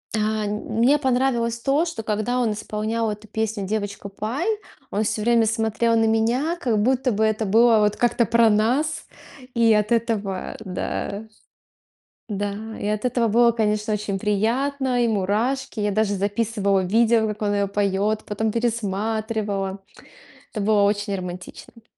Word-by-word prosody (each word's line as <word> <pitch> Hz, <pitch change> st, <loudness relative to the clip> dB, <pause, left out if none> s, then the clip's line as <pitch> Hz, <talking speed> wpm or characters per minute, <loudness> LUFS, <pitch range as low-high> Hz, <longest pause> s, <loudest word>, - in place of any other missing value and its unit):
А, 215 Hz, 0 st, 0 dB
нь 210 Hz, +1 st, -2 dB
мне 240 Hz, +7 st, +3 dB
понравилось 245 Hz, -3 st, +1 dB
то, 285 Hz, +6 st, +1 dB
что, 230 Hz, -10 st, -5 dB
когда 215 Hz, +4 st, -1 dB
он 230 Hz, -3 st, +1 dB
исполнял 215 Hz, +2 st, -2 dB
эту 210 Hz, +1 st, -8 dB
песню 220 Hz, -1 st, -2 dB
"Девочка 200 Hz, 0 st, -4 dB
Пай", 225 Hz, -, -3 dB, 0.5 s
он 210 Hz, +2 st, 0 dB
всё 215 Hz, 0 st, -2 dB
время 230 Hz, -1 st, +3 dB
смотрел 225 Hz, +1 st, +1 dB
на 225 Hz, 0 st, +3 dB
меня, 235 Hz, +9 st, +1 dB
как 230 Hz, -4 st, +1 dB
будто 255 Hz, +2 st, +2 dB
бы 215 Hz, +1 st, 0 dB
это 220 Hz, 0 st, +1 dB
было 225 Hz, +2 st, +5 dB
вот 210 Hz, 0 st, +2 dB
как-то 240 Hz, -1 st, +2 dB
про 230 Hz, 0 st, +4 dB
нас, 245 Hz, +9 st, +1 dB, 0.5 s
и 230 Hz, -1 st, +4 dB
от 210 Hz, +1 st, +1 dB
этого, 215 Hz, -5 st, -1 dB
да 200 Hz, +1 st, -4 dB, 1.0 s
да 205 Hz, 0 st, -2 dB, 0.3 s
и -, -, -3 dB
от 215 Hz, +3 st, -1 dB
этого 240 Hz, -2 st, +1 dB
было, 235 Hz, +2 st, +4 dB
конечно, 215 Hz, -1 st, 0 dB
очень 210 Hz, -1 st, -2 dB
приятно, 245 Hz, +6 st, 0 dB
и -, -, +2 dB
мурашки. 220 Hz, +5 st, -1 dB
Я 205 Hz, 0 st, 0 dB
даже 210 Hz, 0 st, +1 dB
записывала 200 Hz, 0 st, 0 dB
видео, 220 Hz, +4 st, +3 dB
как 210 Hz, 0 st, -5 dB
он 205 Hz, 0 st, +1 dB
её 200 Hz, 0 st, +1 dB
поёт, 200 Hz, +1 st, 0 dB
потом 215 Hz, +1 st, -1 dB
пересматривала. 215 Hz, -3 st, -2 dB, 0.8 s
Это 215 Hz, -, -2 dB
было 210 Hz, -1 st, +3 dB
очень 205 Hz, 0 st, 0 dB
романтично. 185 Hz, +5 st, -9 dB
220 Hz, 155 wpm, -23 LUFS, 205-235 Hz, 1.0 s, было